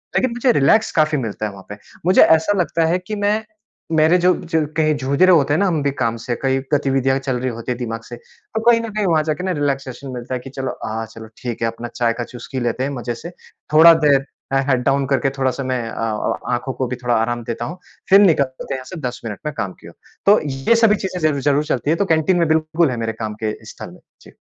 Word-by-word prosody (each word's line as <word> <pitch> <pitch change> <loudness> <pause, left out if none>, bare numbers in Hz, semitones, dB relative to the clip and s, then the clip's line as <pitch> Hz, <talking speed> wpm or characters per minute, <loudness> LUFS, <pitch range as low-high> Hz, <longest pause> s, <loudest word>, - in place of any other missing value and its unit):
लेकिन 255 - +2
मुझे 245 +2 +2
रिलैक्स 180 +11 +3
काफ़ी 155 -1 +3
मिलता 110 -4 -3
है 105 - -3
वहाँ 95 -1 -13
पे। 105 - -7 0.3
मुझे 185 +2 +5
ऐसा 160 +6 +4
लगता 165 -2 +1
है 175 +3 +1
कि 185 +4 -6
मैं 210 +2 +2 0.6
मेरे 160 +3 +5
जो 180 - +6 0.2
जो 160 -1 +3
कहीं 155 -1 +2
जूझ 140 +1 -2
रहे 185 0 +7
होते 145 -4 +4
हैं 155 - +2
ना 200 - +3
हम 165 -5 0
भी 140 - +1
काम 115 -4 -1
से, 120 - 0
कई 135 0 +1
गतिविधियाँ 135 -2 +2
चल 130 -2 -2
रही 130 +1 -1
होती 115 +1 -5
है 125 - -2
दिमाग 115 -2 -4
से। 120 - -6
तो 220 - -8
कहीं 230 -1 +4
न 230 - -5
कहीं 210 -1 -1
वहाँ 160 -4 +2
जाके 155 +2 -2
ना 190 - -1
रिलैक्सेशन 135 -1 -3
मिलता 125 +1 -6
है 130 - -1
कि 130 +2 -10
चलो 135 0 -5
हाँ 110 +1 -3
चलो 110 -1 -10 0.2
ठीक 120 -2 -4
है 115 - +2
अपना 115 +1 -5
चाय 120 -1 +1
का 120 +1 -4
चुस्की 125 +2 -7
लेते 120 +1 -1
हैं 140 - -2
मज़े 120 0 -4
से। 170 - -8 0.4
थोड़ा 165 +2 +9
देर 140 -2 +4 0.3
ए - - +4
हेड 130 -3 +2
डाउन 140 +1 +2
करके 135 0 +1
थोड़ा-सा 135 0 -1
मैं 130 -1 -1
अ - - -8
अ 110 +1 -2
आँखों 120 +2 -2
को 130 +1 -2
भी 125 - -3
थोड़ा 120 -1 +2
आराम 120 +2 -1
देता 115 +1 -4
हूँ। 175 +9 -6 0.3
फिर 195 - +8
निकलते 140 -9 +2
हैं - - -2
यहाँ 130 - -9
से 185 - -9
10 125 -2 -4
मिनट 105 -3 -5
में 150 - -2
काम 95 -2 -3
की - - -12
ओर। - - -12 0.3
तो 205 +2 +6
ये 135 +12 +1
सभी 225 -2 +4
चीज़ें 185 -1 -4
ज़रूर-ज़रूर 145 -1 +2
चलती 140 -1 -1
हैं। 165 - +2
तो 200 - +2
कैंटीन 160 +1 +2
में 170 - +2
बिल्कुल 160 0 +1
है 120 - -3
मेरे 115 -1 -2
काम 110 -1 -5
के 110 -1 0
स्थल - - -9
में - - -15 0.2
जी। - - -16
135 Hz, 260 wpm, -19 LUFS, 120-160 Hz, 0.6 s, थोड़ा